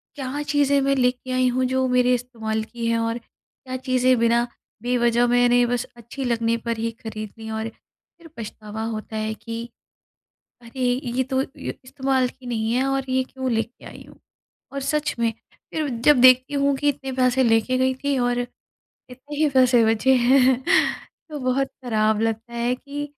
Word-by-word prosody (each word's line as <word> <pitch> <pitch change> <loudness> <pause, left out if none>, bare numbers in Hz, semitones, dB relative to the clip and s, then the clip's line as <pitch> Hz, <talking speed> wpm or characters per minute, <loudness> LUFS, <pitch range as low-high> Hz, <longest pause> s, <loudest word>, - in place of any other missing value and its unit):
क्या 275 0 -4
चीज़ें 285 -1 +2
मैं 275 0 +2
लेके 255 0 0
आई 255 0 +3
हूँ 255 +1 0
जो 260 0 +2
मेरे 250 0 +3
इस्तेमाल 225 -3 -3
की 230 +1 -5
हैं 230 0 +1
और 230 0 -1
क्या 255 +2 -11
चीज़ें 255 -1 +2
बिना 235 +1 +3 0.4
बेवजह 240 -1 +2
मैंने 245 0 +4
बस 240 0 -1
अच्छी 235 +4 -7
लगने 230 -2 +1
पर 230 0 -3
ही 230 +1 -2
खरीद 215 -2 -6
ली, 220 0 -7
और 220 0 -3
फिर 330 +8 -22
पछतावा 215 -1 -7
होता 215 0 -6
है 215 0 -2
कि 230 +2 -7 0.9
अरे! 235 +3 -10 0.2
ये 245 +1 0
तो 265 +1 0
ये 270 - -7
इस्तेमाल 265 -1 0
की 255 0 -14
नहीं 225 -2 -1
है 255 +2 +2
और 270 0 0
ये 260 0 +2
क्यों 260 0 -4
लेके 225 +2 -3
आई - - -11
हूँ। - - -17 0.6
और 275 - -3
सच 300 +2 -1
में, 230 -1 +2 0.4
फिर 310 -2 -1 0.2
जब 295 -4 +6
देखती 255 +2 +6
हूँ 280 0 +2
कि 290 +2 +2
इतने 270 -1 -4
पैसे 255 0 +2
लेके 225 +2 +2
गई 260 0 +2
थी 280 -1 +1
और 245 0 +1 0.7
इतने 270 +4 -9
ही 305 +1 +3
पैसे 255 -3 +5
बचे 225 +4 +3
हैं, 255 +1 +4 0.7
तो 300 - -5
बहुत 265 +1 0 0.2
ख़राब 215 -2 +1
लगता 225 +1 -2
है 235 +1 0
कि 285 +3 -6
250 Hz, 180 wpm, -23 LUFS, 230-265 Hz, 0.9 s, जब